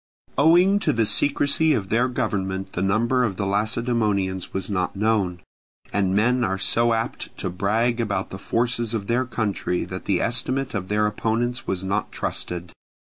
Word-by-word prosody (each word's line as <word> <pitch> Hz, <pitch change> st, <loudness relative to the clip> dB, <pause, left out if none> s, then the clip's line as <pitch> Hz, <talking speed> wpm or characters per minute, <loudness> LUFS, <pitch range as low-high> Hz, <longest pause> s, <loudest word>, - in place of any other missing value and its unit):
Owing 175 Hz, +7 st, +5 dB
to -, -, +1 dB
the 115 Hz, -1 st, +2 dB
secrecy 145 Hz, +6 st, +3 dB
of 95 Hz, -3 st, -2 dB
their 120 Hz, +3 st, +2 dB
government 95 Hz, -6 st, -2 dB
the 90 Hz, -, -2 dB
number 115 Hz, +6 st, +2 dB
of 105 Hz, -6 st, -1 dB
the 100 Hz, -, -1 dB
Lacedaemonians 105 Hz, -2 st, 0 dB
was 95 Hz, -, -3 dB
not 90 Hz, -2 st, -1 dB
known, 100 Hz, -4 st, 0 dB, 0.5 s
and 95 Hz, -2 st, +1 dB
men 120 Hz, +4 st, +3 dB
are 95 Hz, -4 st, 0 dB
so 115 Hz, +4 st, +2 dB
apt 115 Hz, +1 st, -4 dB
to 95 Hz, -, -3 dB
brag 110 Hz, +6 st, 0 dB
about 105 Hz, -3 st, -2 dB
the 95 Hz, -, -6 dB
forces 120 Hz, 0 st, -1 dB
of 105 Hz, -3 st, -3 dB
their 120 Hz, +4 st, +1 dB
country 105 Hz, -7 st, -2 dB
that -, -, -7 dB
the -, -, +1 dB
estimate 130 Hz, +3 st, -1 dB
of 95 Hz, -4 st, -3 dB
their 105 Hz, +1 st, +1 dB
opponents 115 Hz, +4 st, -1 dB
was 95 Hz, -1 st, -2 dB
not 100 Hz, +2 st, -1 dB
trusted. 90 Hz, 0 st, -4 dB
110 Hz, 170 wpm, -23 LUFS, 95-120 Hz, 0.5 s, Owing